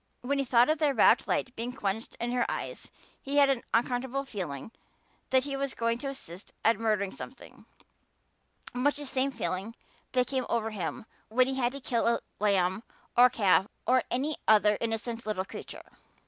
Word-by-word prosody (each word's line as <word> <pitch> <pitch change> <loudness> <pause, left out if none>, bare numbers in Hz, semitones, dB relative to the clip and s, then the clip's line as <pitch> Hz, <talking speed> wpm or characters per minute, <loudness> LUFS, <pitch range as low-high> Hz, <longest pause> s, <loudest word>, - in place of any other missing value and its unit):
When 275 +3 -1
he 275 - +1
thought 240 -1 +5
of 310 - -1
that 295 -3 +2
rapt - - +5
light 255 - -1
being 240 +2 -4
quenched 220 -2 -3
in 240 0 -2
her 245 -1 +1
eyes - - -5 0.3
he 280 +1 -2
had 280 -1 +6
an 255 -3 -1
uncomfortable 250 +3 0
feeling 185 - -5 0.6
that 260 0 +4
he 280 0 -3
was 275 -1 -2
going 230 0 0
to 275 - -4
assist 190 -9 -9
at 225 -2 +4
murdering 210 -4 +1
something - - -11 1.1
much 270 +4 +2
the 290 0 -5
same 265 0 +1
feeling 225 -3 -4 0.4
that 250 -1 +3
came 260 0 -2
over 225 -1 0
him 190 -1 -4 0.2
when 250 +3 +4
he 265 - -1
had 250 -2 +1
to 280 - -6
kill 235 -3 0
a 235 - +3 0.2
lamb 195 -2 +2 0.3
or 245 +1 +8
calf 200 -5 +3 0.2
or 255 0 +4
any 285 +5 -1
other 210 -1 +5
innocent 230 0 -3
little 190 -3 -1
creature. - - -9
240 Hz, 180 wpm, -29 LUFS, 215-265 Hz, 1.1 s, or